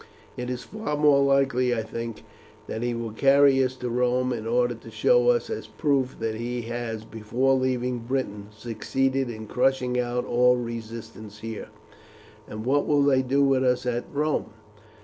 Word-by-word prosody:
It 125 0 -4
is 125 -1 -4
far 205 - -4
more 145 -2 +5
likely, 135 -3 +2
I 110 - -2
think, 115 0 -6 0.4
that 110 - -5
he 120 0 -1
will 115 -1 -4
carry 135 +3 +5
us 130 0 -1
to 125 -1 -4
Rome 125 +1 +1
in 115 -2 -5
order 120 +1 +2
to 115 - -12
show 485 0 +3
us 480 -1 +2
as 445 - -4
proofs 135 -3 0
that 115 -1 -1
he 120 +2 -4
has, 115 -1 -4
before 115 +5 0
leaving 125 -1 0
Britain, 115 -4 -3
succeeded 125 +4 -1
in 110 -1 -7
crushing 125 +2 +1
out 125 0 -1
all 125 +1 +4
resistance 115 -2 -7
here." 115 -1 -6 0.8
"And 110 +1 -7
what 145 +3 +2
will 145 -1 +3
they 135 -2 +4
do 135 +2 +2
with 135 -1 +3
us 125 -1 +1
at 120 -1 -1
Rome?" 150 -2 0
125 Hz, 170 wpm, -25 LUFS, 115-135 Hz, 0.8 s, more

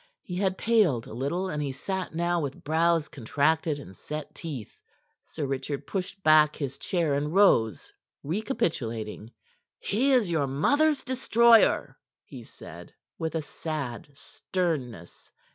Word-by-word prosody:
He 180 - -5
had 190 -1 0
paled 200 - +2
a - - -10
little, 145 +10 -2
and 150 -5 -3
he 140 -2 -2
sat 190 +8 -4
now 170 +1 +1
with 140 -2 -5
brows 165 +1 +2
contracted 150 +4 0
and 95 -10 -11
set 150 +6 -7
teeth. 140 - -7 0.4
Sir 155 - -5
Richard 135 +1 -3
pushed 195 0 -5
back 155 -1 +5
his 140 -2 -5
chair 170 -5 0
and 150 +4 -1
rose, 115 - +3 0.3
recapitulating. 120 - -3 0.5
"He 250 +7 +1
is 235 -9 +3
your 150 -4 +1
mother's 285 - +2
destroyer," 235 -3 +4 0.2
he - - -11
said, - - -12 0.2
with 160 -1 -3
a 160 - -1
sad 145 -6 -5
sternness. 140 - -4
155 Hz, 135 wpm, -27 LUFS, 140-185 Hz, 0.5 s, back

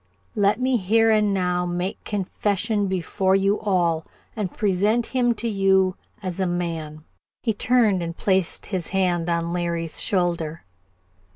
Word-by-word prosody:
Let 205 +2 +2
me 255 0 +2
here 225 +3 +3
and 210 -1 +3
now 180 -2 0
make 175 +2 -3
confession 205 +1 -1
before 190 +1 0
you 195 +2 +2
all, 175 -6 +1 0.3
and 205 -5 -3
present 210 +4 +1
him 245 -2 +1
to 235 - -3
you 190 -3 +2 0.3
as 185 -1 -4
a 190 - +1
man 165 -3 -3 0.2
" - - -69
He 225 - +1
turned 220 -4 +2
and 170 0 -5
placed 190 -3 0
his 185 -5 -3
hand 175 -3 0
on 170 0 -1
Larry's 170 -2 -1
shoulder. 170 -4 -1
190 Hz, 150 wpm, -23 LUFS, 175-210 Hz, 0.3 s, here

